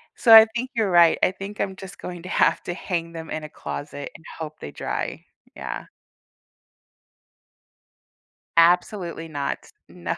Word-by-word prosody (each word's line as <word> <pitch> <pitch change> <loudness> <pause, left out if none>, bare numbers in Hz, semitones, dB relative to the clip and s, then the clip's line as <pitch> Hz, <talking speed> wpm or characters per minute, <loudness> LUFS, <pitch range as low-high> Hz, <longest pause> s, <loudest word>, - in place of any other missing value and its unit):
So, 230 - +6
I 220 0 +12
think 255 +2 -3
you're 220 -4 +1
right, 170 -2 +6
I - - +4
think 195 +2 -8
I'm 190 -1 -2
just 190 +1 -10
going 175 -2 -7
to 180 - -8
have - - +3
to 175 - -4
hang 170 -2 -3
them 165 -1 -8
in 155 - -4
a 155 - -7
closet 145 -1 -7
and 160 - -14
hope 155 -1 -7
they 75 - -8
dry - - -4 0.3
yeah. - - -6 2.7
Absolutely 170 0 +2
no, 145 -3 -2 0.4
no. - - -4
175 Hz, 155 wpm, -24 LUFS, 160-195 Hz, 2.7 s, I